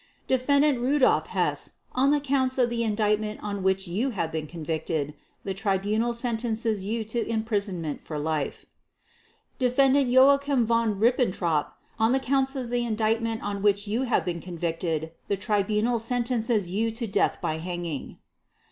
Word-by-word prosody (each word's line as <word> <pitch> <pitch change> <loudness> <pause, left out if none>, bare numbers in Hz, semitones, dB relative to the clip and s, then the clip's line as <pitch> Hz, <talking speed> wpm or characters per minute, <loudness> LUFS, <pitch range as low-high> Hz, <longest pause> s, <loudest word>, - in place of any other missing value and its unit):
"Defendant 280 +1 +3
Rudolf 260 +2 +3
Hess, - - -1 0.2
on 265 +2 +2
the 295 0 +3
Counts 265 -2 +1
of 245 -2 +2
the 235 -1 -1
Indictment 215 -1 0
on 200 -1 -3
which 190 0 +1
you 210 +10 -1
have 180 -9 -2
been 155 -1 -3
convicted, 160 -2 -3 0.3
the 195 - -3
Tribunal 205 +4 0
sentences 230 -3 -1
you 220 +3 -2
to 225 +2 -2
imprisonment 200 -8 -2
for 155 - -6
life. 150 -1 -2 0.9
"Defendant 265 +2 +3
Joachim 275 0 +5
von 230 -3 +1
Ribbentrop, 185 - +1 0.3
on 225 +2 +3
the 265 - +3
Counts 270 +1 +1
of 250 -3 -4
the 245 0 +1
Indictment 225 0 0
on 200 -1 -3
which 205 0 +2
you 220 +5 0
have 250 -3 +1
been 170 -2 -3
convicted, 165 -2 -3 0.2
the 200 - 0
Tribunal 210 +3 +1
sentences 230 -4 0
you 220 +4 +1
to 230 +2 -3
death 200 -1 +1
by 155 0 -2
hanging. 175 -3 -5
220 Hz, 150 wpm, -26 LUFS, 190-245 Hz, 0.9 s, Joachim